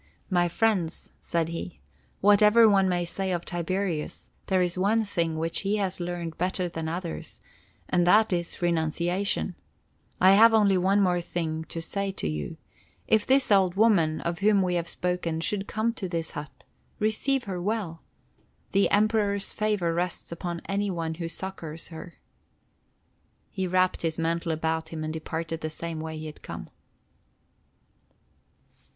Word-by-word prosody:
"My 175 -1 +3
friends," 190 -4 0
said 165 -1 -1
he, 170 +1 -6 0.4
"whatever 210 +3 +6
one 195 -2 +4
may 175 -1 0
say 190 +2 -3
of 175 -1 -2
Tiberius, 175 -2 -3 0.2
there 185 -2 +3
is 175 -1 -1
one 205 +5 +2
thing 165 -5 -1
which 165 +1 0
he 200 +1 0
has 195 -3 -2
learned 175 -2 -4
better 180 0 0
than 165 -2 -4
others; 170 0 -5 0.5
and 175 -1 +2
that 215 +2 +5
is—renunciation. 175 +2 0 0.7
I 185 +1 +7
have 225 +3 +7
only 205 -3 +4
one 195 +3 +3 0.2
thing 170 -2 -3
more - - -5
to 165 - -6
say 200 +3 -2
to - - -4
you: 75 -1 -4 0.5
If 215 -1 +3
this 265 -3 +4
old 190 -3 +4
woman, 190 -8 +3
of 170 0 -3
whom 200 -1 +4
we 180 -1 0
have 170 -1 -1
spoken, 180 -2 -2
should 200 +3 -2
come 220 +2 0
to 195 -5 -5
this 165 -2 -3
hut, 145 0 -9 0.3
receive 240 +5 +1
her 185 -4 -4
well! 190 -5 -2 0.7
The 195 0 +3
Emperor's 205 -1 +2
favor 205 -6 0
rests 175 0 -3
upon 170 0 -4
any 200 +1 0
one 165 -3 -2
who 165 +1 -4
succors 165 -3 -6
her." 165 +1 -9 1.4
He 190 -2 -2
wrapped 185 0 +2
his 165 -1 -1
mantle 165 0 -1
about 160 0 -1
him 160 -1 -5
and 155 0 -3
departed 160 +1 -4
the 155 - -2
same 165 +1 -5
way 160 0 -5
that - - -6
he - - -6
had 155 -1 -9
come. - - -8
180 Hz, 155 wpm, -27 LUFS, 165-200 Hz, 1.4 s, I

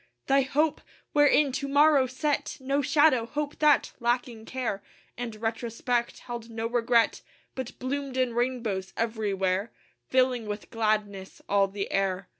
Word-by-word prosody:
Thy 275 0 +4
hope! 300 +3 0 0.3
wherein 290 -1 +4
To 280 +2 -3
morrow 285 -1 +5
set 285 +3 -2
No 275 +2 0
shadow; 285 -4 +3
hope 295 +2 -4
that, 300 -1 +4
lacking 240 -2 -1
care 240 -6 -3 0.3
And 235 -2 -5
retrospect, 230 +2 -2
held 235 -2 -7
no 225 0 -4
regret, 235 0 +2 0.3
But 260 -2 -6
bloomed 270 0 -3
in 255 -2 +1
rainbows 230 -6 -2
everywhere 205 -3 -1 0.4
Filling 255 -3 +2
with 205 0 -6
gladness 210 -3 -1
all 200 -1 +3
the 195 0 -5
air. 195 -1 -1
240 Hz, 135 wpm, -27 LUFS, 215-270 Hz, 0.4 s, morrow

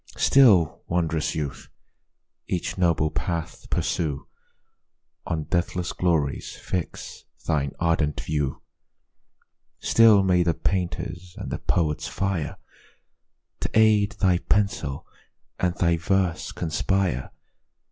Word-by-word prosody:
Still, 105 - +5
wond'rous 80 -3 0
youth! 75 -3 -4 0.8
each 90 - -2
noble 85 -4 +2
path 85 -1 -4
pursue, 75 -4 -1 1.0
On 80 -2 -1
deathless 85 +1 -1
glories 80 -6 0
fix 90 -3 -5 0.2
thine 70 -4 0
ardent 80 -3 +1
view: 75 -3 -2 1.2
Still 110 -3 +6
may 90 -2 +3
the 85 -1 +1
painter's 90 -1 -3
and - - -6
the - - -3
poet's 80 -4 0
fire 95 -5 -2 1.0
To - - -2
aid 110 -1 +4
thy 90 -5 +2
pencil, 95 -11 -1 0.5
and 90 -1 0
thy 85 -1 +2
verse 90 +1 0
conspire! 85 -4 -1
85 Hz, 100 wpm, -25 LUFS, 80-95 Hz, 1.2 s, Still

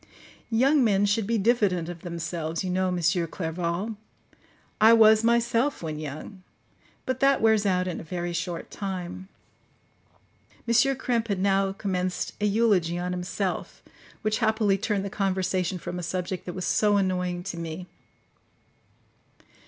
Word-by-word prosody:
Young 265 +5 +4
men 205 -3 +3
should 205 0 +1
be 230 0 +1
diffident 200 -6 +2
of 175 -1 -7
themselves, 170 -1 -4
you 185 - -2
know, 185 +1 +1
M. 180 -1 -1 0.3
Clerval: 175 +6 -3 0.8
I 220 +1 +8
was 220 -1 +6
myself 235 +2 +1
when 155 -2 -4
young; 155 +6 -7 0.6
but 260 0 -2
that 275 0 +4
wears 220 -2 +3
out 185 -1 +1
in 180 - -3
a - - -8
very 175 +1 -4
short 170 0 -4
time." 190 -1 -5 1.4
M. 235 - +2 0.2
Krempe 240 -3 -1
had 200 -3 -1
now 195 0 +2
commenced 185 -2 -2
an 210 -1 +2
eulogy 195 -6 +2
on 180 +1 -3
himself, 180 +1 -3 0.4
which 215 0 0
happily 220 -2 +2
turned 200 -1 -1
the 200 - -5
conversation 185 -2 -1
from 180 +1 -5
a - - -4
subject 180 +1 -4
that 180 - -4
was 185 - -3
so 205 +4 +3
annoying 180 -2 -1
to 180 -2 -5
me. 165 +1 -5
190 Hz, 145 wpm, -26 LUFS, 175-215 Hz, 1.4 s, I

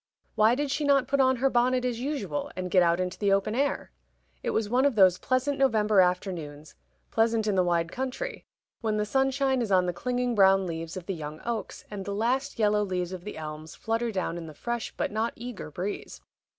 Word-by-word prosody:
Why 220 +3 +4
did 285 0 -2
she 300 - -1
not 275 -3 +3
put 280 +1 +1
on 260 -1 +4
her 265 +2 +2
bonnet 250 +1 +2
as 240 -2 -1
usual 240 - -3
and 185 -1 -4
get 185 - +5
out 170 0 +3
into 180 0 -3
the 200 -2 +2
open 195 +2 +2
air? 280 +4 -1 0.5
It - - -2
was 220 -1 0
one 250 +4 +2
of 280 -4 +2
those 185 -3 +5
pleasant 260 +2 0
November 215 -6 +4
afternoons 170 -5 -2 0.4
pleasant 225 -1 +2
in 210 - +1
the 185 - +3
wide 170 -1 0
country 265 - -4 0.4
when 215 -2 -1
the 210 - 0
sunshine 265 +2 +1
is 220 -4 -2
on 185 -1 +4
the 180 - -1
clinging 250 +5 -1
brown 195 -2 +5
leaves 165 0 -5
of 180 - -7
the 195 - -2
young 155 -2 -7
oaks, 230 -4 -4
and 200 -2 -5
the 200 +1 -4
last 250 +6 0
yellow 210 -1 +3
leaves 180 -2 -2
of 180 -2 -7
the 210 - -6
elms 155 0 -7
flutter 230 +1 -1
down 185 -3 -2
in 165 - -8
the 155 - -10
fresh 235 +4 -3
but - - -1
not 220 +2 -1
eager 240 -7 -7
breeze. 180 +7 -5
210 Hz, 215 wpm, -27 LUFS, 180-250 Hz, 0.5 s, get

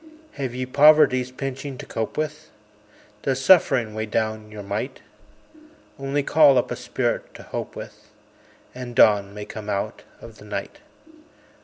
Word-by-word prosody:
Have 130 -4 -5
ye 130 0 -2
Poverty's 140 -2 +5
pinching 135 +1 -6
to - - -8
cope 110 -1 -4
with? 155 0 -4 0.7
Does 135 -1 -1
Suffering 135 - +4
weigh 110 0 -3
down 110 0 -2
your 105 -1 -9
might? 105 +7 -4 1.0
Only 140 +1 -1
call 145 -2 +5
up 125 - 0
a - - -1
spirit 125 0 -3
to - - -10
hope - - -6
with, - - -10 0.6
And 125 -1 -8
dawn 100 -3 +5
may 105 0 -6
come 105 -1 -8
out 100 -1 -3 0.2
of 115 -1 -13
the - - -13
night. 105 - -6
125 Hz, 150 wpm, -23 LUFS, 110-140 Hz, 1.0 s, Poverty's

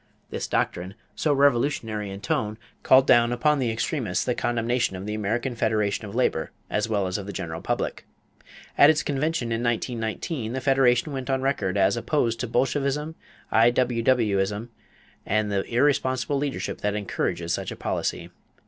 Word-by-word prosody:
This - - -3
doctrine, 90 +3 -1 0.2
so 155 - +1
revolutionary 120 -6 +1
in 100 +1 -7
tone, 105 +1 -1 0.2
called 130 0 +6
down 120 -2 +5
upon 150 +4 +2
the 125 -3 0
extremists 115 - -1
the 125 - +1
condemnation 120 -3 0
of 95 +1 -6
the 105 - -3
American 110 +5 -1
Federation 110 -2 0
of 100 - -9
Labor 100 -10 +1 0.2
as 105 +1 0
well 100 -3 +1
as 95 +2 -2
of 100 - -7
the - - -4
general 80 -3 -5
public. - - -2 0.8
At 145 - +9
its 155 -1 +3
convention 140 -3 -1
in 115 0 -1
1919, 120 +1 -2
the 130 - -1
Federation 135 +1 +3
went 130 0 -5
on 130 -1 0
record 105 -8 0
as 95 0 +3
"opposed 115 -1 0
to 125 - -2
Bolshevism, 140 +5 0 0.4
I.W.W. 115 -2 +3
ism, 105 +4 -2 0.5
and 105 0 0
the 100 -1 0
irresponsible 130 +1 +1
leadership 140 -1 -3
that 105 0 0
encourages 85 -4 -2
such - - -2
a - - -5
policy." - - -3
120 Hz, 165 wpm, -25 LUFS, 105-130 Hz, 0.8 s, At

